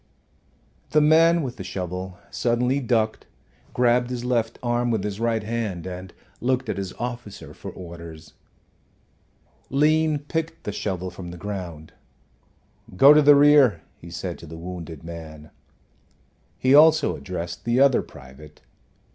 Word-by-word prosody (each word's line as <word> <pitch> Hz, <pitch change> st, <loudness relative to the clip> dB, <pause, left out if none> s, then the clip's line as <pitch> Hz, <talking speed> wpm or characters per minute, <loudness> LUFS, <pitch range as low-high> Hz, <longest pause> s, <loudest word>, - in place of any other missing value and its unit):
The 155 Hz, -, +4 dB
man 165 Hz, +2 st, +5 dB
with 125 Hz, -2 st, -5 dB
the 95 Hz, -, -6 dB
shovel 90 Hz, 0 st, -5 dB
suddenly 125 Hz, +3 st, 0 dB
ducked, 115 Hz, -4 st, -1 dB, 0.4 s
grabbed 120 Hz, 0 st, +2 dB
his 125 Hz, -1 st, -4 dB
left 120 Hz, -2 st, 0 dB
arm 120 Hz, 0 st, 0 dB
with 110 Hz, -4 st, 0 dB
his 105 Hz, 0 st, -4 dB
right 115 Hz, -1 st, 0 dB
hand, 105 Hz, -6 st, -3 dB
and 90 Hz, 0 st, -7 dB, 0.3 s
looked 130 Hz, -1 st, -1 dB
at -, -, -2 dB
his 95 Hz, -2 st, -4 dB
officer 120 Hz, -3 st, -7 dB
for -, -, -9 dB
orders. 85 Hz, -3 st, -11 dB, 1.4 s
Lean 155 Hz, +2 st, +2 dB
picked 160 Hz, +3 st, -4 dB
the 105 Hz, -, -3 dB
shovel 95 Hz, -3 st, -4 dB
from 90 Hz, 0 st, -9 dB
the 85 Hz, -, -9 dB
ground. 85 Hz, -6 st, -7 dB, 1.0 s
"Go 140 Hz, +6 st, +9 dB
to 150 Hz, -, +6 dB
the 145 Hz, 0 st, +7 dB
rear," 140 Hz, -, +5 dB
he 85 Hz, -, -13 dB
said 90 Hz, +1 st, -5 dB
to 85 Hz, -, -11 dB
the 80 Hz, +2 st, -9 dB
wounded 85 Hz, -3 st, -8 dB
man. 80 Hz, -2 st, -10 dB, 1.1 s
He 130 Hz, +1 st, +2 dB
also 155 Hz, 0 st, +6 dB
addressed 85 Hz, -1 st, -6 dB
the 120 Hz, +2 st, +1 dB
other 135 Hz, -2 st, +5 dB
private. 75 Hz, +3 st, -14 dB
110 Hz, 140 wpm, -24 LUFS, 90-130 Hz, 1.4 s, Go